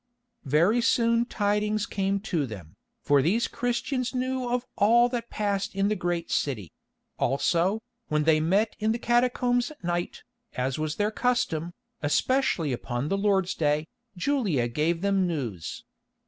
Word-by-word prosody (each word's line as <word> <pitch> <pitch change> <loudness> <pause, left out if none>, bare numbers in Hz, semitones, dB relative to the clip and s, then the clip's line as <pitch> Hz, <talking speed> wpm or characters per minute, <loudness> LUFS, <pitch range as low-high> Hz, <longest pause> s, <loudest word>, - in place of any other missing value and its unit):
Very 170 - +3
soon 230 0 +3
tidings 210 0 0
came 195 -2 -1
to 170 -9 -1
them, 95 -8 -10 0.3
for 145 -1 +4
these 210 - +2
Christians 250 +1 -2
knew 255 0 -1
of 245 0 -1
all 235 +4 +5
that 235 -1 -4
passed 200 -2 -2
in 195 +1 +2
the 215 - +1
great 175 -3 -2
city; 110 - -1 0.5
also, 175 - +1 0.2
when 150 0 +1
they 155 0 +4
met 195 +8 +1
in 215 +1 +1
the - - -2
catacombs 245 +1 +1
at 305 -8 -15
night, 175 0 -2 0.3
as 130 +3 -2
was 155 0 -2
their 210 +1 0
custom, 175 -9 -1 0.3
especially 165 - +1
upon 120 +3 -3
the - - +1
Lord's 195 -2 +1
Day, 150 0 +1 0.3
Julia 185 - +1
gave 155 +7 0
them 195 -2 +2
news. 120 - -4
195 Hz, 145 wpm, -27 LUFS, 155-235 Hz, 0.5 s, all